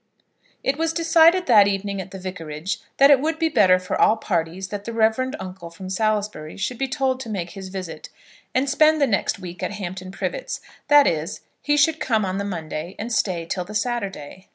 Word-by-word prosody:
It 275 Hz, +3 st, 0 dB
was 325 Hz, 0 st, 0 dB
decided 335 Hz, +2 st, +5 dB
that 210 Hz, -5 st, +6 dB
evening 200 Hz, 0 st, -2 dB
at 185 Hz, -, -9 dB
the 195 Hz, -, -8 dB
Vicarage 180 Hz, -2 st, -5 dB, 0.2 s
that 275 Hz, +1 st, +7 dB
it 280 Hz, -, +7 dB
would 315 Hz, +3 st, -1 dB
be 325 Hz, 0 st, +1 dB
better 185 Hz, -11 st, +5 dB
for 185 Hz, 0 st, -3 dB
all 220 Hz, -, +5 dB
parties 180 Hz, -2 st, -2 dB
that 205 Hz, -1 st, -5 dB
the 230 Hz, -, -5 dB
reverend 225 Hz, +4 st, +1 dB
uncle 185 Hz, -2 st, -8 dB
from 185 Hz, +3 st, -9 dB
Salisbury 210 Hz, -6 st, -1 dB
should 245 Hz, +4 st, -3 dB
be 270 Hz, -, 0 dB
told 260 Hz, 0 st, 0 dB
to 235 Hz, -, -7 dB
make 180 Hz, -5 st, -4 dB
his 190 Hz, -2 st, -8 dB
visit, 185 Hz, -5 st, -7 dB, 0.5 s
and 260 Hz, +2 st, +2 dB
spend 310 Hz, +2 st, +4 dB
the 280 Hz, -, +4 dB
next 205 Hz, -7 st, 0 dB
week 180 Hz, -2 st, -9 dB
at -, -, -2 dB
Hampton 185 Hz, -2 st, -6 dB
Privets; -, -, -4 dB, 0.3 s
that 290 Hz, 0 st, +7 dB
is, 160 Hz, +3 st, -1 dB
that -, -, -37 dB, 0.2 s
he 295 Hz, 0 st, +1 dB
should 315 Hz, +2 st, +3 dB
come 220 Hz, -4 st, +1 dB
on 190 Hz, +1 st, -2 dB
the -, -, -1 dB
Monday 170 Hz, -2 st, -5 dB
and 225 Hz, +3 st, -4 dB
stay 175 Hz, -6 st, 0 dB
till 180 Hz, +2 st, -3 dB
the 210 Hz, +4 st, -10 dB
Saturday. 195 Hz, -8 st, -3 dB
200 Hz, 210 wpm, -23 LUFS, 185-260 Hz, 0.5 s, that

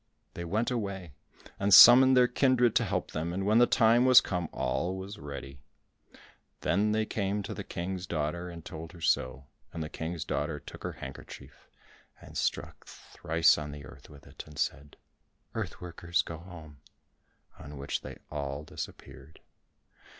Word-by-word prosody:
They 85 Hz, -, -6 dB
went 110 Hz, +8 st, -1 dB
away, 100 Hz, -8 st, -4 dB, 0.5 s
and 100 Hz, +1 st, 0 dB
summoned 130 Hz, +6 st, +9 dB
their 125 Hz, -1 st, +6 dB
kindred 125 Hz, -2 st, +2 dB
to -, -, +1 dB
help -, -, -2 dB
them 80 Hz, +2 st, -3 dB
and 95 Hz, +2 st, -3 dB
when 110 Hz, +3 st, +4 dB
the 120 Hz, -, +6 dB
time 115 Hz, 0 st, +4 dB
was 130 Hz, -1 st, +8 dB
come, 90 Hz, -3 st, -3 dB
all 90 Hz, +9 st, -2 dB
was 100 Hz, +3 st, -8 dB
ready. 70 Hz, -2 st, -8 dB, 1.0 s
Then 105 Hz, +4 st, +1 dB
they 110 Hz, 0 st, +1 dB
came 100 Hz, -1 st, -2 dB
to -, -, -6 dB
the -, -, -6 dB
King's 90 Hz, +1 st, -5 dB
daughter 85 Hz, +2 st, -3 dB
and 85 Hz, -2 st, -10 dB
told 80 Hz, +1 st, -8 dB
her 85 Hz, -, -13 dB
so, 65 Hz, -3 st, 0 dB, 0.3 s
and 80 Hz, -2 st, -5 dB
the 75 Hz, -, -6 dB
King's 80 Hz, -1 st, -5 dB
daughter -, -, -2 dB
took -, -, -12 dB
her -, -, -4 dB
handkerchief -, -, -11 dB, 0.5 s
and -, -, -14 dB
struck -, -, -3 dB
thrice 80 Hz, 0 st, +1 dB
on 75 Hz, -1 st, -6 dB
the 70 Hz, -1 st, -9 dB
earth 65 Hz, 0 st, -14 dB
with 70 Hz, -1 st, -15 dB
it, -, -, -10 dB
and 75 Hz, -1 st, -14 dB
said, 75 Hz, 0 st, -3 dB, 0.6 s
"Earth -, -, -5 dB
workers, 85 Hz, -1 st, -2 dB
go 80 Hz, -1 st, -8 dB
home," 80 Hz, -5 st, -12 dB, 0.8 s
on 75 Hz, 0 st, -10 dB
which 70 Hz, +1 st, -3 dB
they -, -, -9 dB
all 70 Hz, -1 st, -4 dB
disappeared. 70 Hz, -1 st, -10 dB
85 Hz, 165 wpm, -29 LUFS, 75-100 Hz, 1.0 s, summoned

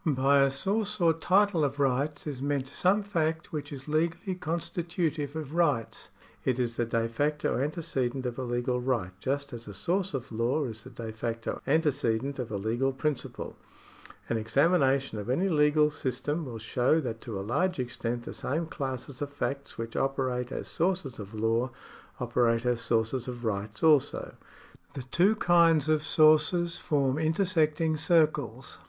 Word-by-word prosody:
By 140 Hz, -2 st, +3 dB
a 135 Hz, -, +5 dB
source 205 Hz, +9 st, -1 dB
or 165 Hz, -2 st, +4 dB
title 185 Hz, +1 st, +3 dB
of 140 Hz, 0 st, -1 dB
rights 140 Hz, +2 st, 0 dB
is 140 Hz, -4 st, -5 dB
meant 140 Hz, -1 st, -1 dB
some 190 Hz, +8 st, +2 dB
fact 165 Hz, -5 st, -1 dB
which 150 Hz, -1 st, -4 dB
is 135 Hz, -1 st, -8 dB
legally 165 Hz, +4 st, 0 dB
constitutive 165 Hz, -3 st, -2 dB
of 155 Hz, -2 st, -5 dB
rights. 150 Hz, -10 st, 0 dB, 0.3 s
It 130 Hz, -2 st, +1 dB
is 120 Hz, -2 st, -1 dB
the 120 Hz, -, 0 dB
de 115 Hz, -1 st, 0 dB
facto 145 Hz, +4 st, 0 dB
antecedent 135 Hz, -4 st, -2 dB
of 125 Hz, +1 st, -3 dB
a -, -, -2 dB
legal 120 Hz, +1 st, -1 dB
right 120 Hz, -8 st, -1 dB
just 140 Hz, +4 st, -2 dB
as 115 Hz, -1 st, -8 dB
a 100 Hz, -, -8 dB
source 180 Hz, -, -1 dB
of 135 Hz, -1 st, -5 dB
law 120 Hz, +7 st, 0 dB
is 110 Hz, -3 st, -6 dB
the -, -, -11 dB
de 115 Hz, -2 st, -7 dB
facto 115 Hz, +1 st, -4 dB
antecedent 140 Hz, -4 st, +1 dB
of 120 Hz, -4 st, -4 dB
a 105 Hz, -, -1 dB
legal 120 Hz, +7 st, 0 dB
principle. 140 Hz, +1 st, -3 dB, 0.7 s
An 115 Hz, -, 0 dB
examination 135 Hz, +1 st, +2 dB
of 105 Hz, -, -6 dB
any 170 Hz, +10 st, +2 dB
legal 150 Hz, -2 st, +4 dB
system 145 Hz, +4 st, -2 dB
will 120 Hz, -4 st, -6 dB
show 125 Hz, +7 st, +2 dB
that 115 Hz, -5 st, -5 dB
to 110 Hz, -5 st, -5 dB
a 95 Hz, -, -5 dB
large 180 Hz, -, 0 dB
extent 120 Hz, -1 st, -3 dB
the -, -, -7 dB
same 160 Hz, +5 st, -2 dB
classes 135 Hz, -3 st, -5 dB
of 145 Hz, -, -2 dB
facts 140 Hz, -1 st, -4 dB
which 115 Hz, 0 st, -5 dB
operate 130 Hz, -2 st, -1 dB
as -, -, -4 dB
sources 170 Hz, -8 st, -1 dB
of 105 Hz, +1 st, -8 dB
law 115 Hz, +3 st, +1 dB, 0.5 s
operate 120 Hz, -1 st, +1 dB
as 120 Hz, -1 st, +1 dB
sources 115 Hz, +2 st, 0 dB
of 120 Hz, -1 st, -6 dB
rights 105 Hz, 0 st, -3 dB
also. 150 Hz, -4 st, +3 dB, 0.6 s
The 135 Hz, -2 st, -5 dB
two 180 Hz, -, +3 dB
kinds 165 Hz, -6 st, +4 dB
of 155 Hz, -1 st, +3 dB
sources 165 Hz, +3 st, +4 dB
form 140 Hz, -3 st, +1 dB
intersecting 160 Hz, -2 st, +1 dB
circles. 150 Hz, -7 st, +1 dB
140 Hz, 165 wpm, -29 LUFS, 120-160 Hz, 0.7 s, a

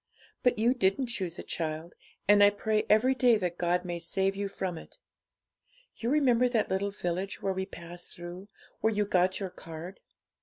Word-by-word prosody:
But 250 Hz, -2 st, +3 dB
you 235 Hz, +3 st, +3 dB
didn't 220 Hz, +1 st, +1 dB
choose 180 Hz, -6 st, -3 dB
it, -, -, -8 dB
child; 160 Hz, +1 st, -4 dB, 0.3 s
and 205 Hz, 0 st, +7 dB
I 205 Hz, -, +8 dB
pray 215 Hz, +1 st, 0 dB
every 225 Hz, +5 st, +5 dB
day 250 Hz, -3 st, +4 dB
that 180 Hz, -3 st, -3 dB
God 180 Hz, +1 st, +1 dB
may 175 Hz, -1 st, -3 dB
save 190 Hz, +3 st, 0 dB
you 200 Hz, 0 st, -2 dB
from 190 Hz, -2 st, -4 dB
it. -, -, -14 dB, 1.0 s
You 235 Hz, -, -2 dB
remember 250 Hz, -4 st, +4 dB
that 225 Hz, -5 st, 0 dB
little 195 Hz, +1 st, 0 dB
village 190 Hz, 0 st, -3 dB
where 195 Hz, -, +1 dB
we 190 Hz, 0 st, -3 dB
passed 175 Hz, -2 st, -10 dB
through, 175 Hz, +3 st, -9 dB, 0.3 s
where 220 Hz, -, +2 dB
you 210 Hz, -1 st, +1 dB
got 185 Hz, -1 st, +2 dB
your 190 Hz, -3 st, -4 dB
card?' 165 Hz, +1 st, -9 dB
195 Hz, 185 wpm, -29 LUFS, 175-215 Hz, 1.0 s, I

